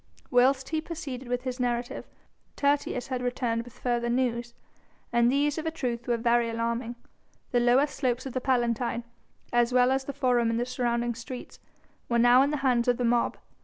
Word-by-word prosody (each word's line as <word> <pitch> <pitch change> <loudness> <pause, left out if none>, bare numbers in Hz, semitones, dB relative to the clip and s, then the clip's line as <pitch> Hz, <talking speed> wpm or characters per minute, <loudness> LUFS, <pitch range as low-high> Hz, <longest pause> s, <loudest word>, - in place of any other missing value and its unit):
Whilst 260 +1 +3
he 315 -1 -1
proceeded 275 -7 -6
with 245 +1 -2
his 255 0 -4
narrative, 245 -1 -2 0.5
Tertius 280 -3 0
had 255 -2 -2
returned 245 -2 -1
with 240 0 -13
further 240 -1 -1
news. 240 -1 -1 0.6
And 235 0 +4
these, 290 +2 +1
of 320 - -4
a - - +3
truth, 245 -7 -4
were 240 -1 +1
very 235 0 +2
alarming. 230 +1 -2 0.6
The 245 - +3
lower 245 +4 +4
slopes 260 -3 -2
of 265 - -5
the 255 - -2
Palatine, 240 -2 0 0.5
as 240 0 +3
well 250 0 +4
as 265 0 0
the 280 - -3
Forum 250 -4 +2
and 230 0 0
the 240 - 0
surrounding 240 -1 -1
streets, 235 +2 -9 0.5
were 235 - +2
now 245 +2 +6
in 280 - +3
the 300 - -1
hands 245 -2 +2
of 245 -1 +3
the 245 - 0
mob. 235 0 +1
245 Hz, 190 wpm, -27 LUFS, 235-260 Hz, 0.6 s, now